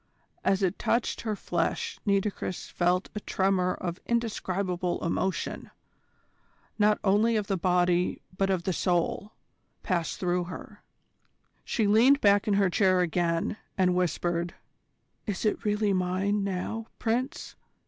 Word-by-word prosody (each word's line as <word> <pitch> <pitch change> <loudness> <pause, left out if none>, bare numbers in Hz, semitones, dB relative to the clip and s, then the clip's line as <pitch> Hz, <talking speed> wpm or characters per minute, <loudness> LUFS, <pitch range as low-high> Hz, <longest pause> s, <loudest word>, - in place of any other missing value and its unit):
As 195 0 +2
it 190 +1 0
touched 235 +1 0
her 215 -2 -2
flesh 460 - -2
Nitocris 200 -2 -1
felt 180 +1 +1
a 210 - -3
tremor 190 -2 +1
of 175 0 -5
indescribable 190 -7 -1
emotion, 185 +3 -2 1.1
not 210 0 +4
only 215 +4 +3
of 210 -2 0
the 195 - -1
body 180 0 +2 0.2
but 195 +1 +1
of 185 -3 0
the 190 0 0
soul, 180 +4 0 0.5
pass 175 -5 -1
through 180 -1 0
her. 180 - -9 0.8
She 225 - 0
leaned 235 +7 +5
back 205 -2 +4
in 205 - +3
her 200 -1 +4
chair 185 -1 +3
again, 170 +2 0 0.2
and 185 -1 +3
whispered: 175 -1 -1 0.7
"Is 205 0 -2
it 215 - 0
really 210 -1 +1
mine 190 +3 0
now, 200 +4 -3
Prince? 245 +3 -2
190 Hz, 130 wpm, -28 LUFS, 180-210 Hz, 1.1 s, leaned